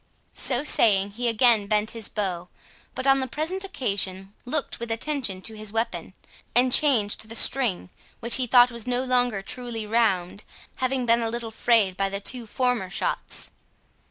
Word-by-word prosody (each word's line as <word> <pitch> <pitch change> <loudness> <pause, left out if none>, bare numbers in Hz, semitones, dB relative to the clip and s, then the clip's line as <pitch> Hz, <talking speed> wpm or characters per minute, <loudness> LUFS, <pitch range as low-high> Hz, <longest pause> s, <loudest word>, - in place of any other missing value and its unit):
So 255 +1 0
saying, 200 -8 +3
he 240 +4 -3
again 230 -2 +3
bent 210 +1 +1
his 225 -3 -3
bow, 180 -4 -3 0.5
but 260 - -4
on 270 0 +4
the 260 - -2
present 325 +9 -3
occasion 195 - -3
looked 285 +3 -2
with 235 0 -6
attention 225 -5 -2
to 225 - -1
his 215 -1 -6
weapon, 195 -5 -3 0.4
and 250 +1 +3
changed 220 -7 +3
the 230 - -7
string, 230 -8 +2 0.3
which 235 +1 +2
he 255 -2 -1
thought 245 +1 +5
was 235 0 -6
no 250 +1 0
longer 245 -5 0
truly 235 0 -6
round, 205 -4 0 0.3
having 260 -1 -1
been 235 0 +3
a 225 - -1
little 235 -1 -5
frayed 220 -4 +1
by 195 0 0
the 200 0 -4
two 235 +3 0
former 245 -5 -1
shots. 180 - -3
230 Hz, 170 wpm, -24 LUFS, 200-250 Hz, 0.5 s, thought